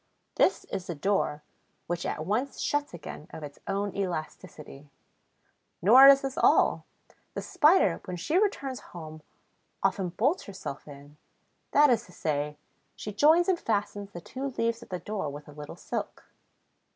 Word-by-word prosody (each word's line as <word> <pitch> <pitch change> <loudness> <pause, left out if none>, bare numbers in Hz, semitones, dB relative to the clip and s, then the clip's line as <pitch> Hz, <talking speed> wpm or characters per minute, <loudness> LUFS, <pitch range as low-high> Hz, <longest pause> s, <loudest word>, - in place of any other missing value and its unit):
This - - +2
is 185 0 -4
the 170 - -4
door, 150 -3 0 0.4
which 175 0 -3
at 155 - -3
once 235 +9 -1
shuts 290 0 -1
again 160 -3 -9
of 160 - -9
its 145 -1 -9
own 200 0 -2
elasticity. 155 -5 -6 0.9
Nor 250 +9 +8
is 275 0 +8
this 270 -1 -4
all: - - +4 0.5
the - - -2
Spider, 300 - +4
when 180 -1 -5
she 305 - +1
returns 275 - -1 0.2
home, 155 -1 -9 0.6
often 190 -4 +1
bolts 265 - 0
herself 190 -9 -7
in; 145 +1 -13 0.5
that 290 -1 +5
is 235 -1 +1
to - - -16
say, 150 -3 -2 0.4
she 210 - -6
joins 315 - +5
and 370 -3 +2
fastens 205 -2 -2
the 175 -4 -9
two 265 +10 -5
leaves 230 0 0
of - - -13
the 185 - -3
door 195 -5 -4
with 145 +1 -9
a - - -11
little 150 0 -9
silk. - - -5
195 Hz, 160 wpm, -28 LUFS, 155-260 Hz, 0.9 s, Nor